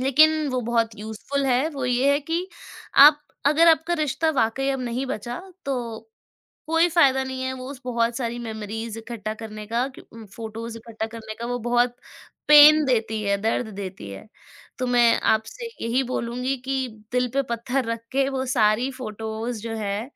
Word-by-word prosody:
लेकिन 305 +4 +4
वो 255 -1 -1
बहुत 230 -1 0
यूज़फुल 220 +6 -3
है। 260 +4 +2
वो 275 -4 -5
ये 250 +3 +2
है 285 - +2
कि 330 +5 -2 0.6
आप 295 0 +7 0.3
अगर 320 +3 +5
आपका 325 +1 +3
रिश्ता 310 +1 0
वाक़ई 270 -1 0
अब 270 - -2
नहीं 250 +2 -3
बचा 240 +2 -5 0.2
तो, 245 - -4 0.6
कोई 330 +2 +4
फ़ायदा 275 -6 +4
नहीं 260 0 -5
है 260 0 -2
उस 260 +1 -8
बहुत 235 -1 0
सारी 240 -2 -3
मेमोरीज़ 225 0 -5
इकट्ठा 220 -2 -5
करने 215 -1 -8
का 235 +3 0 0.3
उम, 225 -1 -10
फ़ोटोज़ 225 +2 -7
इकट्ठा 225 -1 -5
करने 220 -1 -8
का, 235 - -6
वो 245 0 -2
बहुत 240 +1 +1 0.5
पेन 300 +1 +9
देती 220 -4 0
है, 200 0 +1
दर्द 225 +2 0
देती 190 - -7
है। 100 - -10 0.5
तो 255 - -1
मैं 240 -1 +4
आपसे 220 - -4 0.2
यही 240 +3 +1
बोलूँगी 250 +3 -2
कि 265 -1 -1 0.2
दिल 250 0 +1
पे 275 - +2
पत्थर 245 +2 -1
रख 230 0 -4
के 270 0 +2
वो 265 -1 -2
सारी 235 0 +2
फ़ोटोज़ 220 -2 -5
जो 225 -1 -5
है 205 -1 -2
245 Hz, 175 wpm, -24 LUFS, 225-270 Hz, 0.6 s, पेन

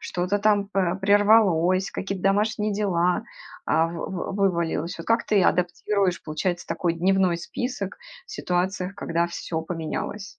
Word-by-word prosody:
что-то 180 +3 -1
там 205 -1 +2
па 185 -4 0
прервалось, 195 -2 +3
какие-то 195 -1 -4
домашние 210 +2 +1
дела 185 -2 +1 0.5
а 160 - +3
вы 170 0 -5
вы 190 +1 -4 0.2
вывалилось. 170 -1 -2
Вот 165 - -9
как 230 +1 +2
ты 205 -3 +3
адаптируешь, 180 +1 +1
получается, 175 +3 -3
такой 170 -2 -1
дневной 185 0 +2
список 205 +3 -5 0.3
в - - -14
ситуациях, 180 - -2
когда 170 -2 -1
всё 170 -1 -4
поменялось? 165 +4 -4
185 Hz, 140 wpm, -24 LUFS, 170-205 Hz, 0.5 s, прервалось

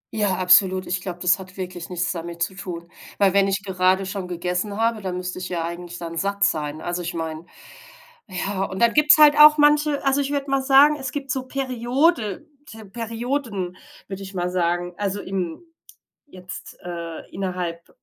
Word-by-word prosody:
Ja, 205 -3 +1
absolut, 185 0 +5
ich 180 +1 -2
glaube, 180 -2 -6
das 180 +2 +4
hat 185 0 -12
wirklich 180 -2 -6
nichts 180 0 -1
damit 170 0 -4
zu 190 - -3
tun, 170 -3 -7 0.3
weil 195 -2 +3
wenn 200 0 +4
ich 195 0 -1
gerade 190 0 +1
schon 190 -1 -5
gegessen 180 +4 -3
habe, 225 -1 +1
dann 185 -1 -4
müsste 180 0 -5
ich 180 - -5
ja 170 -2 -2
eigentlich 175 0 -7
dann 170 -1 -6
satt 200 +3 -1
sein. 155 -4 0
Also, 175 0 -3
ich 170 0 -5
meine, 160 0 -5 0.8
ja 190 +1 -3
und 190 - -7
dann 235 0 +4
gibt's 300 0 +6
halt 300 -1 +7
auch 300 0 +9
manche 295 0 +3
also, 275 +1 +3
ich 280 +1 -3
würde 280 -1 -2
mal 270 -1 +2
sagen, 280 +3 +6
es 265 -2 -5
gibt 275 -3 -4
so 260 -1 -2
Periode 255 - 0 0.2
te 220 -1 -11
Perioden, 230 -3 -4 0.3
würde 195 0 -7
ich 190 0 -9
mal 180 0 -1
sagen, 175 0 -1
also, 205 -1 -2
im 185 - -4 0.6
jetzt, 185 -8 -10
äh, 170 -2 -6
innerhalb 180 -3 -4
190 Hz, 185 wpm, -23 LUFS, 180-235 Hz, 0.8 s, auch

